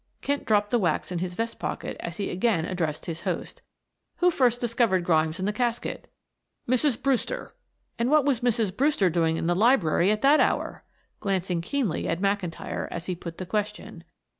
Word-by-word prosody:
Kent 285 0 -1
dropped 210 -1 +2
the 240 - +3
wax 175 -1 0
in 175 - -2
his 180 0 -3
vest 230 +2 -3
pocket - - -4
as 170 -1 -6
he 200 - -2
again 185 -3 +1
addressed 165 -4 -2
his 165 -1 -5
host. - - -4 0.5
"Who 360 0 +3
first 245 -6 +2
discovered 230 -6 +1
Grimes 160 -1 +2
in 190 - -1
the 210 - 0
casket?" 235 +1 -2 0.6
"Mrs. 255 0 +2
Brewster." 275 - -1 0.5
"And 235 +2 +1
what 300 -1 +4
was 275 -5 +2
Mrs. 230 -5 +1
Brewster 260 - +2
doing 165 -1 +1
in - - -2
the 175 - +2
library 195 - +3
at 215 +2 0
that 285 +3 +6
hour?" - - 0 0.4
glancing 185 -3 -1
keenly 230 - -1
at 165 - -1
McIntyre 195 -4 -2
as 170 - -5
he 185 - -2
put 170 -1 -8
the 185 - -5
question. 210 +2 -4
205 Hz, 185 wpm, -26 LUFS, 175-240 Hz, 0.6 s, that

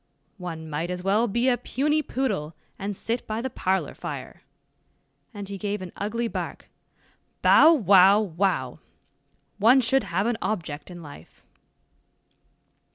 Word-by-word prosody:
One 165 -3 -6
might 155 +3 -3
as 180 0 -4
well 210 +5 +2
be 235 +4 0
a 250 -2 +3
puny 300 +4 0
poodle, 205 - -3 0.2
and 200 +1 -4
sit 230 +5 -4
by 215 +1 -2
the 260 +2 -4
parlor 190 -2 -1
fire," - - -7 0.9
and 205 -4 -8
he 200 0 -6
gave 205 0 -2
an 180 - -8
ugly 230 +3 -2
bark, - - -6 0.7
"bow, 320 - +7
wow, 200 - +6
wow! 195 -1 -1 0.8
one 235 +6 +6
should 265 +2 +2
have 185 +4 -1
an 235 -1 -1
object 160 -8 -4
in 175 -2 -10
life." 145 - -14
205 Hz, 140 wpm, -25 LUFS, 180-235 Hz, 0.9 s, bow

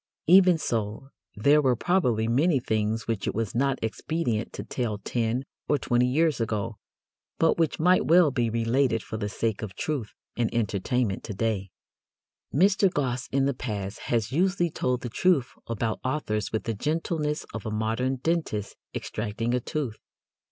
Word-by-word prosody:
Even 180 0 +7
so, 115 -1 -3 0.3
there 145 +8 +4
were 130 -3 +3
probably 120 - +1
many 140 +6 +3
things 110 -2 -1
which 115 -3 -2
it - - -1
was 110 -3 -2
not 135 +2 +1
expedient 115 -1 -2
to - - -6
tell 115 -5 -2
ten 115 +4 -1 0.2
or 145 - +4
twenty 125 -1 +2
years 150 0 +2
ago, 110 0 -2 0.6
but 165 +1 +3
which 165 -2 +1
might 180 +3 +4
well 170 -2 +6
be 120 -3 0
related 115 +1 +1
for 110 - -5
the 105 -1 -3
sake 110 0 -2
of 100 -4 -6
truth 135 -6 -3 0.2
and 120 -2 0
entertainment 110 0 0
to 105 - -6
day. 100 -2 -1 0.8
Mr. 195 +4 +4
Gosse 130 -6 -1
in 135 0 +2
the 140 - +1
past 105 -5 -4
has 115 -2 +1
usually 175 +2 +1
told 125 -3 -1
the - - -4
truth 155 -1 +2 0.2
about 115 -1 -2
authors 130 -6 -1
with 110 - -1
the 115 - -2
gentleness 150 - -1
of 110 -1 -5
a - - -1
modern 110 +5 0
dentist 130 -8 -2 0.2
extracting 110 +2 -2
a 125 - +2
tooth. 125 -3 -4
120 Hz, 165 wpm, -27 LUFS, 110-150 Hz, 0.8 s, Even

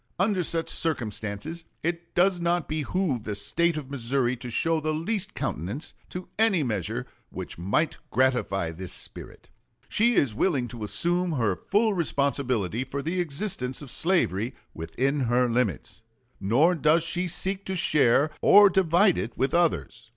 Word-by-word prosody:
Under 190 0 +2
such 165 -1 -1
circumstances 120 - -3 0.2
it 170 0 -3
does 180 0 +3
not 170 -1 0
behoove 155 - -1
the 105 -1 -4
State 170 +11 +1
of 140 -3 -6
Missouri 130 -1 0
to 125 +1 -7
show 165 +7 +1
the 155 0 -1
least 200 +4 -3
countenance 100 - -4 0.2
to 180 0 -6
any 210 -8 +4
measure 95 - -2 0.2
which - - -7
might 100 - 0
gratify 125 -9 +1
this 90 +2 -7
spirit. - - -10 0.4
She 235 +2 +2
is 130 -6 +2
willing 130 - +1
to 120 -3 -9
assume 175 - 0
her 115 -9 +1
full 210 - +1
responsibility 135 - 0
for 140 +2 -5
the 175 +3 -1
existence 145 -6 -2
slavery 125 - +1 0.2
within 135 - -1
her 125 0 +2
limits, 115 - -1 0.4
nor 125 - +3
does 160 0 +3
she 175 +2 -2
seek 190 +3 -3
to 190 - -3
share 150 -3 +3
or 205 -1 +8
divide 185 +1 +3
it 115 - -5
with 135 +1 0
others. 170 -8 0
150 Hz, 150 wpm, -26 LUFS, 120-175 Hz, 0.4 s, or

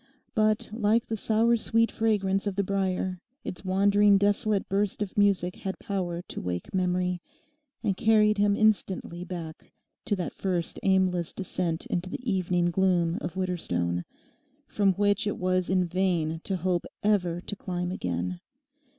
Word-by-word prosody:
But, 215 -1 +1
like 225 +1 +2
the 225 - -3
sour 225 +2 +2
sweet 230 +1 +1
fragrance 205 -3 +1
of 200 - -2
the 200 - +1
brier, 185 -2 -1 0.2
its 180 - -6
wandering 200 +2 +4
desolate 205 +1 +1
burst 200 +1 0
of 195 - -8
music 195 -3 +2
had 190 -1 -4
power 180 -3 -3
to - - -7
wake 90 -1 -4
memory, 180 -1 0 0.6
and 195 - +1
carried 215 0 +4
him 205 0 +4
instantly 195 -5 +1
back 170 -3 -7 0.3
to 205 - +1
that 180 -3 -4
first 180 -4 -2
aimless 185 -3 +2
descent 180 -3 -3
into 180 +1 -2
the 250 +6 -6
evening 180 -4 +1
gloom 175 -2 +2
of 175 - -4
Widderstone 90 - -1 0.6
from 200 -2 +2
which 205 +2 +1
it 205 - -1
was 185 0 0
in 185 -1 +3
vain 170 -3 0
to 195 - -1
hope 180 0 -1 0.2
ever 180 -5 +2
to 205 - -5
climb 180 -2 -3
again. 90 - -3
190 Hz, 150 wpm, -27 LUFS, 175-205 Hz, 0.6 s, wandering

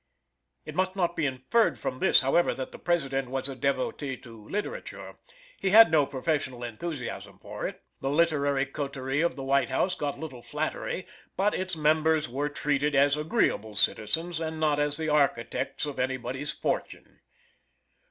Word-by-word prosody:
It 155 - -7
must 185 +2 0
not 175 -3 0
be 155 -4 +1
inferred 135 - +1
from 130 0 -4
this, - - +5
however, 135 +6 +2
that 130 -1 -5
the - - -10
President 135 -7 0
was 135 +1 -2
a 135 - -6
devotee 135 +1 -1
to 120 - -13
literature. 205 - -6 0.4
He 195 - +1
had 220 -2 +9
no 150 -3 +4
professional 135 -3 -2
enthusiasm 125 +3 -5
for - - -5
it. - - -9 0.2
The 135 - -2
literary 145 -3 +2
coterie 140 0 -2
of 170 - +1
the 135 - -6
White 140 +1 +2
House 185 - +1
got 145 -5 -3
little 140 -6 -7
flattery - - -3 0.3
but 200 +2 +2
its 185 -1 -2
members 155 0 +3
were 140 +4 -2
treated 145 0 0
as 140 +1 +5
agreeable 150 - 0
citizens 160 - 0
and 160 -1 -3
not 150 -2 +2
as 145 0 +1
the 160 -1 -1
architects 140 -2 +1
of 145 -2 -5
any 130 +1 0
body's 130 +4 -4
fortune. - - -4
145 Hz, 165 wpm, -28 LUFS, 135-160 Hz, 0.4 s, had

